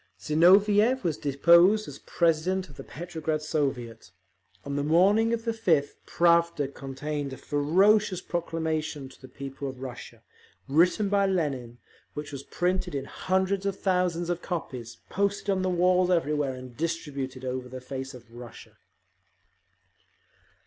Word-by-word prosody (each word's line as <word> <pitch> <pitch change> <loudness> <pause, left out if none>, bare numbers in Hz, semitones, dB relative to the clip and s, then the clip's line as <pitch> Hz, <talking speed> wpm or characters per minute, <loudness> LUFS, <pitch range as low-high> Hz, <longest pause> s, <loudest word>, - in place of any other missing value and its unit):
Zinoviev 205 +10 +4
was 165 -4 0
deposed 170 +10 +4
as 140 -1 -9
president 170 +3 0
of 140 - -15
the - - -8
Petrograd 160 -2 -4
Soviet. 135 -7 -3 0.6
On 140 0 -4
the 145 - 0
morning 195 +9 +4
of 230 0 -2
the 230 - +1
5th, 165 -11 +1
Pravda 170 -4 +2
contained 140 +1 -5
a - - -8
ferocious 185 +7 +2
proclamation 160 -5 -3
to 130 - -18
the 130 - -11
people 135 +1 -7
of 130 -1 -10
Russia, 130 -2 -9 0.4
written 175 +8 +3
by 200 0 +2
Lenin, 140 -10 -2 0.4
which 150 0 -6
was 140 -2 -6
printed 180 +2 -2
in 135 -1 -3
hundreds 190 +4 -1
of 195 -1 -3
thousands 180 -2 0
of 175 0 -3
copies, 130 -9 -5
posted 200 +1 0
on 190 -1 0
the 185 - 0
walls 180 0 +3
everywhere, 150 -6 +1
and 125 -1 -10
distributed 140 -5 -4
over 125 0 -4
the 130 +1 -7
face 130 +1 -6
of 125 - -14
Russia. 120 0 -12
160 Hz, 140 wpm, -27 LUFS, 135-185 Hz, 0.6 s, Zinoviev